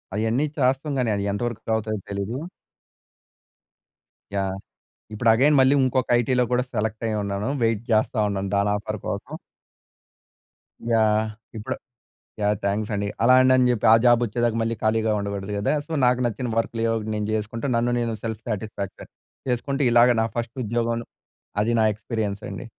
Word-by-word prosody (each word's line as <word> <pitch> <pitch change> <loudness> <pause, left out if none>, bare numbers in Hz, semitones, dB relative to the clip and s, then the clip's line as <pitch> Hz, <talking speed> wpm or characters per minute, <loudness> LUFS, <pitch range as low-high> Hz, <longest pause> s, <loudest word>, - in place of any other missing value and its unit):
అయన్నీ 115 +6 +1
చేస్తాం 135 +2 +1
కానీ, 120 - +1
అది 100 - -2
ఎంతవరకు 115 +1 -3
అవుతాయో 110 -1 -2
తెలీదు. 100 +5 -3 2.0
యాహ్! 95 -1 -1 0.6
ఇప్పుడు 115 +2 0
అగైన్ 145 +6 +4
మళ్ళీ 130 +2 +5
ఇంకొక 130 0 0
ఐటీలో 125 +1 +2
కూడా 125 0 +3
సెలెక్ట్ 110 +1 -2
అయ్యి 110 -1 -1
ఉన్నాను. 100 +3 -2
వెయిట్ 115 -2 +1
చేస్తా 110 +2 +2
ఉన్నాను 100 -1 -3
దాని 100 +1 +2
ఆఫర్ 105 0 -5
కోసం. 110 +6 -5 1.6
యాహ్! 110 -1 +3 0.3
ఇప్పుడు 105 - -4 0.7
యాహ్! 105 0 +2
థాంక్స్ 105 +2 -1
అండి. 100 0 -1 0.2
అలాండి 130 +1 +6
అని 125 -1 +4
చెప్పి 115 -5 +1
ఆ - - +10
జాబ్ 120 -1 +6
వచ్చేదాకా 120 +1 0
మళ్ళీ 115 +1 -1
ఖాళీగా 110 0 +2
ఉండకూడదు 100 0 -4
కదా! 100 - 0
సో, - - -23
నాకు 125 0 +3
నచ్చిన 120 +2 -3
వర్క్‌లు 115 0 -1
ఏయో 115 - +2
ఒకటి 110 -1 -4
నేను 105 -1 -2
చేసుకుంటు 110 +4 -3
నన్ను 120 +1 +1
నేను 115 -1 -1
సెల్ఫ్ 110 -1 -4
సాటిస్ఫాక్షన్ 105 -2 -5 0.4
చేసుకుంటే, 135 +3 -1
ఇలాగ 120 +1 +6
నా - - +1
ఫస్ట్ 115 -1 -3
ఉద్యోగంను 115 +1 -1 0.6
అది 115 - +1
నా 110 - +4
ఎక్స్పీరియన్స్ 105 -2 -3
అండి. - - -7
115 Hz, 155 wpm, -24 LUFS, 105-120 Hz, 2.0 s, ఆ